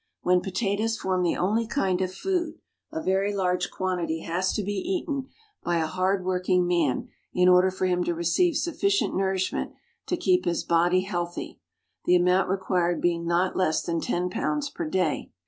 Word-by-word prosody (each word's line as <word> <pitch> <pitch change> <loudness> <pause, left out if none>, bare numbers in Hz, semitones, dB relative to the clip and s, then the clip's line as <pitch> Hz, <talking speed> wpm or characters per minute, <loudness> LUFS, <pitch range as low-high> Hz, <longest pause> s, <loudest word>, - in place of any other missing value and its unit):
When 180 0 +3
potatoes 200 +4 -1
form 185 -3 -1
the 175 - +1
only 215 +5 +1
kind 190 -8 0
of 185 -1 -1
food, 345 - -2 0.4
a 320 0 -4
very 195 +2 +1
large 180 -2 0
quantity 175 -4 -2
has 180 +3 -1
to 210 - -1
be 205 +2 -2
eaten 295 - -2 0.4
by 175 -1 +1
a 160 - +1
hard 185 +3 0
working 180 -1 +1
man 170 -7 0 0.3
in 180 0 +4
order 180 +1 +6
for 185 0 -2
him 180 -1 +1
to 175 - -1
receive 225 - +2
sufficient 370 +5 0
nourishment 190 -1 -1 0.3
to 355 - 0
keep 185 - +2
his 175 -1 0
body 175 +2 +3
healthy, 175 -3 -4 0.5
the 180 - +5
amount 180 +1 +3
required 180 -2 0
being 170 -1 0
not 175 +2 +1
less 160 -4 +1
than 165 -1 -2
ten 180 +1 -1
pounds 285 +7 -1
per 335 -1 -4
day. 180 - 0
185 Hz, 175 wpm, -26 LUFS, 175-200 Hz, 0.5 s, order